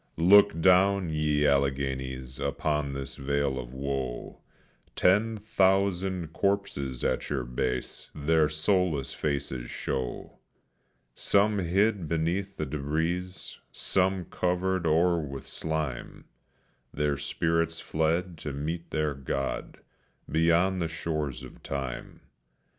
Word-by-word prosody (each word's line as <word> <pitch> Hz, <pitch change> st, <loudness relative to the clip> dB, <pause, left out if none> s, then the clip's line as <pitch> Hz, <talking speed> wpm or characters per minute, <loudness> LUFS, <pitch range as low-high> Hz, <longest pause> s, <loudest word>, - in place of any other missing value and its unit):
Look 95 Hz, +1 st, +6 dB
down, 95 Hz, 0 st, +4 dB
ye 75 Hz, -1 st, +1 dB
Alleghenies, 65 Hz, -2 st, 0 dB
upon 70 Hz, 0 st, -1 dB
this 70 Hz, 0 st, -6 dB
vale 70 Hz, -1 st, 0 dB
of -, -, -7 dB
woe; 65 Hz, -2 st, -4 dB, 0.6 s
Ten 110 Hz, +4 st, +3 dB
thousand 95 Hz, -4 st, +1 dB
corpses 85 Hz, -12 st, -1 dB
at -, -, 0 dB
your 70 Hz, -3 st, -1 dB
base 60 Hz, +1 st, -3 dB
their 75 Hz, +1 st, +3 dB
soulless 80 Hz, -2 st, +1 dB
faces 65 Hz, -4 st, -2 dB
show; 65 Hz, -2 st, -4 dB, 0.7 s
Some 100 Hz, -, +2 dB
hid 95 Hz, +1 st, +1 dB
beneath 85 Hz, +5 st, -1 dB
the 75 Hz, -, -1 dB
debris, 80 Hz, +6 st, -1 dB, 0.4 s
some 95 Hz, -1 st, 0 dB
covered 90 Hz, 0 st, 0 dB
o'er 85 Hz, +2 st, +3 dB
with 70 Hz, -2 st, -6 dB
slime, 80 Hz, -6 st, -4 dB, 0.7 s
Their 75 Hz, -1 st, 0 dB
spirits 80 Hz, +3 st, 0 dB
fled 80 Hz, +2 st, -1 dB
to 75 Hz, -3 st, -5 dB
meet 80 Hz, +4 st, -4 dB
their 75 Hz, -1 st, 0 dB
God, 70 Hz, 0 st, -4 dB, 0.5 s
beyond 85 Hz, +4 st, +3 dB
the 85 Hz, -, +1 dB
shores 75 Hz, -5 st, -3 dB
of -, -, -12 dB
time. 65 Hz, -3 st, -5 dB
80 Hz, 110 wpm, -28 LUFS, 70-90 Hz, 0.7 s, Look